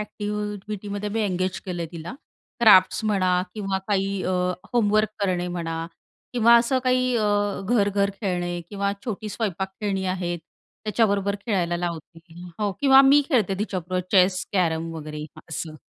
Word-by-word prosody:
एक्टि-व्हिटीमध्ये 210 Hz, -1 st, -4 dB
मी 225 Hz, +1 st, -1 dB
engage 185 Hz, -2 st, -1 dB
केलंय, 175 Hz, -2 st, -3 dB
तिला 170 Hz, +8 st, -7 dB, 0.5 s
crafts 205 Hz, -2 st, +6 dB
म्हणा 185 Hz, -4 st, +2 dB
किंवा 195 Hz, -2 st, -2 dB
काही 195 Hz, -1 st, 0 dB
अ, 185 Hz, -, -1 dB, 0.4 s
होमवर्क 215 Hz, -2 st, +3 dB
करणे 180 Hz, -2 st, 0 dB
म्हणा 165 Hz, -1 st, -4 dB, 0.5 s
किंवा 235 Hz, -1 st, +5 dB
असं 245 Hz, +3 st, +2 dB
काही 255 Hz, 0 st, +2 dB
अ, 205 Hz, -2 st, +1 dB
घर-घर 200 Hz, -3 st, +2 dB
खेळणे 175 Hz, -3 st, -2 dB
किंवा 200 Hz, 0 st, -1 dB
छोटी 215 Hz, -2 st, -4 dB
स्वयंपाक 195 Hz, -3 st, -2 dB
खेळणी 195 Hz, -2 st, -1 dB
आहेत 175 Hz, -2 st, -2 dB, 0.5 s
त्याच्याबरोबर 200 Hz, -2 st, +1 dB
खेळायला 175 Hz, -5 st, 0 dB
लावते, 170 Hz, -1 st, -5 dB, 0.4 s
हो 205 Hz, -1 st, +1 dB
किंवा 270 Hz, -1 st, +7 dB
मी 280 Hz, +2 st, +6 dB
खेळते 220 Hz, -, +2 dB
तिच्याबरोबर 185 Hz, -3 st, -2 dB
चेस, 185 Hz, -1 st, +4 dB
कॅरम 165 Hz, -3 st, 0 dB
वगैरे 150 Hz, -1 st, -6 dB, 0.2 s
असं. 160 Hz, -1 st, -5 dB
200 Hz, 135 wpm, -24 LUFS, 180-210 Hz, 0.5 s, किंवा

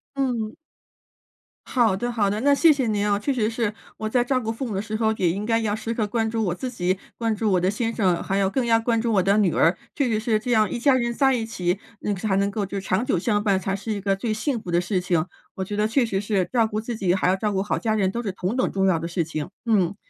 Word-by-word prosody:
嗯。 245 Hz, -6 st, -1 dB, 1.1 s
好 230 Hz, -7 st, +2 dB
的， 240 Hz, +4 st, -2 dB
好 210 Hz, -4 st, +1 dB
的， 205 Hz, +2 st, -1 dB
那 285 Hz, +2 st, +4 dB
谢 320 Hz, +3 st, +6 dB
谢 275 Hz, -4 st, +1 dB
您 210 Hz, -2 st, 0 dB
啊。 200 Hz, -, +3 dB
确 270 Hz, +7 st, -1 dB
实 225 Hz, -4 st, +1 dB
是， 225 Hz, -2 st, -1 dB, 0.2 s
我 220 Hz, -, -3 dB
在 240 Hz, +2 st, +2 dB
照 255 Hz, +1 st, +1 dB
顾 225 Hz, -2 st, -3 dB
父 245 Hz, +3 st, -4 dB
母 215 Hz, -, -4 dB
的 195 Hz, -, 0 dB
时 215 Hz, +1 st, -5 dB
候， 220 Hz, 0 st, +2 dB
也 185 Hz, -5 st, +1 dB
应 195 Hz, +4 st, -3 dB
该 225 Hz, 0 st, +2 dB
要 210 Hz, -2 st, 0 dB
时 220 Hz, +1 st, -4 dB
刻 225 Hz, -2 st, 0 dB
关 225 Hz, +1 st, 0 dB
注 225 Hz, 0 st, -1 dB
我 180 Hz, -4 st, 0 dB
自 255 Hz, +8 st, -4 dB
己、 185 Hz, -5 st, -1 dB, 0.2 s
关 225 Hz, -2 st, 0 dB
注 210 Hz, 0 st, 0 dB
我 180 Hz, -, +4 dB
的 185 Hz, +2 st, +1 dB
先 225 Hz, +2 st, -2 dB
生， 185 Hz, -6 st, +1 dB
还 195 Hz, -, -1 dB
要 195 Hz, -, +2 dB
更 260 Hz, +4 st, 0 dB
要 230 Hz, -1 st, +4 dB
关 230 Hz, 0 st, +1 dB
注 230 Hz, 0 st, 0 dB
我 190 Hz, -3 st, +3 dB
的 200 Hz, +1 st, +3 dB
女 195 Hz, -5 st, +3 dB
儿， 170 Hz, -, +3 dB, 0.2 s
确 280 Hz, -, +1 dB
实 220 Hz, -3 st, +1 dB
是 220 Hz, -1 st, +1 dB
这 245 Hz, +3 st, -3 dB
样 215 Hz, -3 st, +3 dB
一 -, -, -3 dB
家 270 Hz, +3 st, +4 dB
人 235 Hz, -2 st, 0 dB
在 265 Hz, +2 st, +3 dB
一 240 Hz, -3 st, 0 dB
起， 180 Hz, -4 st, -2 dB, 0.2 s
嗯 205 Hz, -, 0 dB
才 195 Hz, +1 st, -1 dB
能 200 Hz, +1 st, +1 dB
够 205 Hz, 0 st, -2 dB
就 200 Hz, +1 st, -4 dB
是 190 Hz, -, -10 dB
长 190 Hz, +5 st, +1 dB
久 225 Hz, -, +1 dB
相 205 Hz, +3 st, 0 dB
伴 200 Hz, -3 st, +2 dB
才 195 Hz, +1 st, -2 dB
是 200 Hz, +3 st, -5 dB
一 205 Hz, -, -2 dB
个 195 Hz, 0 st, +1 dB
最 220 Hz, +3 st, -3 dB
幸 235 Hz, +3 st, -1 dB
福 -, -, -9 dB
的 170 Hz, 0 st, +3 dB
事 180 Hz, +1 st, -1 dB
情， 175 Hz, -3 st, +1 dB, 0.3 s
我 190 Hz, -, -3 dB
觉 205 Hz, -, -4 dB
得 210 Hz, +1 st, +2 dB
确 240 Hz, +3 st, +2 dB
实 195 Hz, -4 st, -1 dB
是 200 Hz, -4 st, 0 dB
照 230 Hz, -3 st, +3 dB
顾 215 Hz, -1 st, -3 dB
自 230 Hz, +2 st, -4 dB
己， 185 Hz, -4 st, +1 dB
还 190 Hz, -, +1 dB
要 185 Hz, -, +3 dB
照 210 Hz, +2 st, -1 dB
顾 190 Hz, -1 st, 0 dB
好 205 Hz, -, -1 dB
家 220 Hz, -2 st, 0 dB
人 190 Hz, -3 st, +1 dB
都 235 Hz, -, -3 dB
是 210 Hz, -4 st, -3 dB
同 185 Hz, +4 st, -3 dB
等 255 Hz, -, +1 dB
重 195 Hz, -1 st, +1 dB
要 170 Hz, -4 st, +2 dB
的 165 Hz, -, -4 dB
事 170 Hz, 0 st, -1 dB
情。 155 Hz, +1 st, -5 dB, 0.2 s
嗯。 200 Hz, -5 st, +2 dB
215 Hz, 320 characters per minute, -24 LUFS, 195-230 Hz, 1.1 s, 谢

